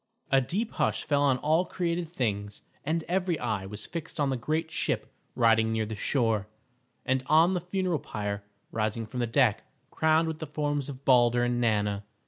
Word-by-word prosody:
A 135 0 +5
deep 205 - -2
hush 110 0 0
fell 145 -1 +1
on 135 -3 +3
all 155 +6 +2
created 175 -2 -2
things, 105 - -3 0.2
and 160 +3 -1
every 180 -1 0
eye 100 -7 -2
was 105 +1 -5
fixed 165 -2 -6
on 140 -2 +2
the - - 0
great 155 +6 -2
ship - - -2 0.2
riding 115 -1 +4
near 110 -1 0
the 110 - -5
shore, 110 -2 0 0.6
and 130 0 +1
on 165 +4 +5
the 180 - -1
funeral 180 -2 -1
pyre 105 -3 -4 0.3
rising 110 +1 -1
from 125 +4 -6
the 120 - 0
deck 115 - +2 0.3
crowned 160 +1 +3
with 160 -1 -4
the 160 - -5
forms 145 -1 -2
of 135 0 -9
Balder 120 -2 +5
and 120 0 0
Nanna. 105 -3 +1
130 Hz, 185 wpm, -28 LUFS, 110-160 Hz, 0.6 s, A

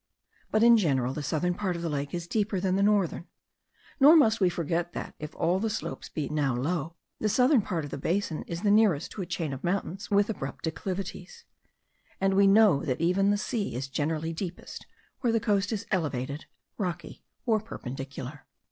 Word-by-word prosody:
But 215 +1 +2
in 235 0 +8
general 135 - +1
the 150 - -4
southern 165 +5 0
part 185 -1 -2
of 170 - -5
the - - -1
lake 145 -1 -3
is 175 -1 -4
deeper 205 +1 -1
than 185 0 +1
the 195 - +1
northern: 200 -4 +1 0.7
nor 290 +4 +8
must 225 -9 +4
we 185 - +5
forget 170 0 -2
that, - - -5
if 150 -1 -7
all 175 +3 +1
the 225 +2 0
shores 220 - -5
be 150 -3 -3
now 145 -4 0
low, 160 +5 -2 0.2
the 215 - +1
southern 255 +3 +4
part 170 -6 -3
of 145 - -9
the - - -5
basin 170 +1 -1
is 170 +3 -5
the 205 - +3
nearest 205 -8 +3
to 205 - -6
a 180 - -4
chain 165 -4 -3
of 135 - -7
mountains 190 +1 -2
with 205 0 +3
abrupt 140 -11 -5
declivities; 195 - -5 0.7
and 195 0 +2
we 195 +1 +5
know 195 -7 +5
that 130 - -1
even 180 +4 +2
the 205 - +3
sea 205 - -2
is 130 +2 -3
generally 155 +4 -2
deepest 175 +1 -7 0.3
where 240 - +1
the 225 - +2
coast 205 -1 +1
is 215 -3 -3
elevated, 145 -6 -2 0.3
rocky, 175 -4 -4 0.2
or 220 -2 +3
perpendicular. 135 - -7
180 Hz, 195 wpm, -28 LUFS, 155-205 Hz, 0.7 s, in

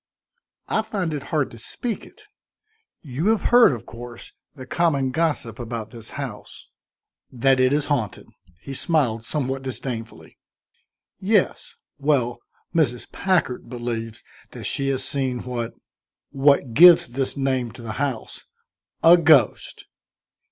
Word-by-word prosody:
"I 220 - +1
find 195 -7 -3
it 145 - -3
hard 150 -4 0
to 115 - -10
speak 230 - -4
it; 430 - -17 0.8
you 145 +5 -3
have 220 -3 +1
heard, 240 -7 +8
of 120 -4 -6
course, 120 0 -10 0.2
the 130 -3 -9
common 140 -3 +1
gossip 140 -7 -1
about 115 -2 -5
this 115 -2 -8
house." - - -8 0.6
"That 130 +1 +2
it 130 0 +4
is 145 +1 +1
haunted?" 125 -9 -2 0.4
he 140 - -7
smiled, 130 -7 0
somewhat 135 -1 -2
disdainfully. 125 -3 -6 0.8
"Yes. 200 0 0 0.2
Well, 135 -5 +1 0.3
Mrs. 130 -8 0
Packard 175 -11 0
believes 115 -2 -5 0.3
that - - -8
she 140 - -2
has 135 -1 -1
seen 130 -3 -2
what 120 -2 -4 0.6
what 140 -3 +3
gives 170 0 +8
this 130 +3 -3
name 130 -3 0
to 120 - -11
the 110 - -5
house." 135 -6 -4 0.6
"A 170 +2 +8
ghost?" 155 -9 +3
135 Hz, 130 wpm, -23 LUFS, 120-155 Hz, 0.8 s, heard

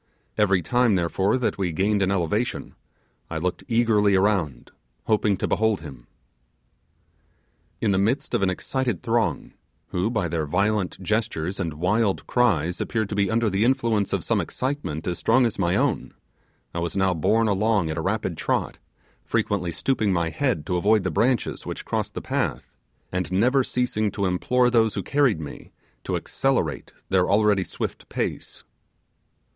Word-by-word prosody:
Every 100 -4 +2
time 120 +1 +2
therefore 95 +5 +1
that 125 -5 -1
we 90 -3 0
gained 100 +5 +1
an 95 - +2
elevation, 100 +5 -1 0.6
I 80 - -3
looked 90 +2 -2
eagerly 110 -4 +3
around, 95 - 0 0.3
hoping 105 -2 +2
to - - -1
behold 110 -4 +1
him. 65 -6 -11 1.7
In 110 - +2
the 95 - +2
midst 115 +8 0
of 120 - +1
an 95 - +2
excited 120 +2 -2
throng, 115 -9 0 0.4
who 90 +4 0
by 110 -7 -1
their 80 -2 -2
violent 100 +4 0
gestures 100 -4 -1
and 80 -5 -2
wild 95 +5 +1
cries 90 -9 +1
appeared 110 -3 -1
to - - -3
be 100 -1 +1
under 115 0 +1
the 100 +1 +1
influence 115 -5 +1
of - - -1
some - - +1
excitement 130 - -3
as 90 - -2
strong 125 +3 +4
as 115 -4 -2
my 85 -2 +2
own, - - 0 0.6
I 85 - -3
was 85 +3 -3
now 95 -1 +2
borne 110 +7 +2
along 100 -4 +1
at 80 - -4
a - - -1
rapid - - -2
trot, - - -1 0.4
frequently 90 -4 -1
stooping 105 +5 0
my 85 -2 +1
head 125 - -1
to 90 +1 0
avoid 105 +3 +3
the 95 - -1
branches 120 - 0
which - - -6
crossed - - -2
the - - -3
path, - - -2 0.4
and 90 -1 -2
never 125 +8 +3
ceasing 125 -4 0
to 100 - -1
implore 125 +7 +2
those 110 -3 +3
who 100 - -2
carried 135 - +2
me 75 -3 -9 0.3
to - - -1
accelerate 130 - -1 0.2
their 95 -1 +2
already 105 -2 +3
swift - - -6
pace. - - -4
100 Hz, 165 wpm, -24 LUFS, 90-115 Hz, 1.7 s, strong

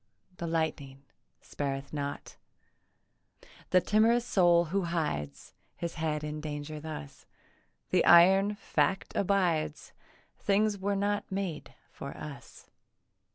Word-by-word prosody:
The 170 - -4
lightning 150 -4 -2 0.4
spareth 140 0 -4
not 145 -1 -5 1.3
The 185 - +5
timorous 225 +5 +3
soul 175 -4 +4
who 195 -2 +1
hides 145 - -3 0.2
His 170 -1 -4
head 155 -2 -2
in 150 0 -4
danger 150 0 -5
thus: 150 - -8 0.6
The - - +4
iron 190 +4 +6
fact 165 -2 -1
abides; 175 -6 0 0.5
Things 205 0 +1
were 200 +1 0
not 205 +1 -1
made 190 -5 -4 0.2
for 140 - -8
us. 140 -5 -10
165 Hz, 110 wpm, -30 LUFS, 150-195 Hz, 1.3 s, iron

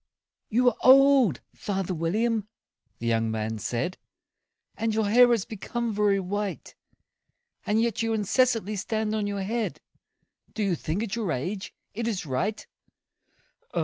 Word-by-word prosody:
"YOU 245 +3 +4
are - - -7
old, 265 - +6
father 195 -2 -3
William," 210 +6 0 0.5
the 120 - -7
young 115 -1 +1
man 110 0 -3
said, 125 - -3 0.8
"And 220 0 -1
your 220 -1 +1
hair 245 +4 +6
has 230 -5 +2
become 230 +2 -4
very 205 -1 +2
white; 200 +1 -4 0.9
And 210 +1 +2
yet 230 -1 0
you 225 0 0
incessantly 220 -1 +1
stand 215 +1 -1
on 215 -1 -1
your 200 -1 -2
head 225 +3 -2 0.8
Do 215 - -1
you 195 -3 +1
think, 170 +5 -2
at 225 -2 -3
your 215 -7 -2
age, 185 +10 -4 0.2
it 230 +2 -3
is 200 -6 -2
right? 180 +11 -2
210 Hz, 145 wpm, -26 LUFS, 185-225 Hz, 0.9 s, old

